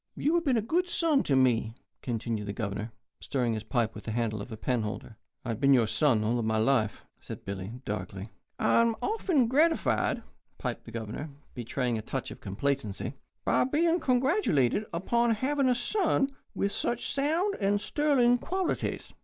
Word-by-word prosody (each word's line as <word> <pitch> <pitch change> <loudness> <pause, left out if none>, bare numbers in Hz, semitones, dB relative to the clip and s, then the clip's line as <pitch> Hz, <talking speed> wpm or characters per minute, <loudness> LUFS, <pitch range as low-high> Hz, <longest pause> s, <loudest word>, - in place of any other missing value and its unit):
"You 300 - +1
have 340 -1 +2
been 260 -4 +3
a 220 - 0
good 350 +10 0
son 320 -5 +3
to 140 - +3
me," 120 -4 +2 0.3
continued 115 -3 -3
the 100 - -3
Governor, 105 +1 -4 0.3
stirring 125 -4 -1
his 110 -1 -3
pipe 115 -1 0
with 105 - -10
the 110 - -3
handle 110 -2 -1
of 110 - -8
a 110 - -6
penholder. 110 -1 -2 0.3
"I've 115 -3 -3
been 140 0 +5
your 120 -3 +4
son 115 -2 +2
all 120 +2 +1
my 110 0 0
life," 110 -1 +1
said - - -9
Billy, 100 +2 -5
darkly. 95 0 -5 0.3
"I - - +4
am 230 -1 +2
often 375 - +2
gratified," 315 +7 +2 0.3
piped - - -4
the 115 - -10
Governor, 115 +7 -5 0.2
betraying 120 -1 -2
a - - -4
touch - - -4
of - - -10
complacency, 120 +2 -2 0.3
"by - - +3
being 330 +6 +2
congratulated 250 - +2
upon 230 +7 +1
having 270 +3 +1
a 250 - +3
son 275 - +1 0.2
with 200 - 0
such 240 +3 -2
sound 325 +9 +1
and 200 0 +2
sterling 250 -2 +3
qualities. 375 +4 -2
140 Hz, 170 wpm, -29 LUFS, -, 0.3 s, been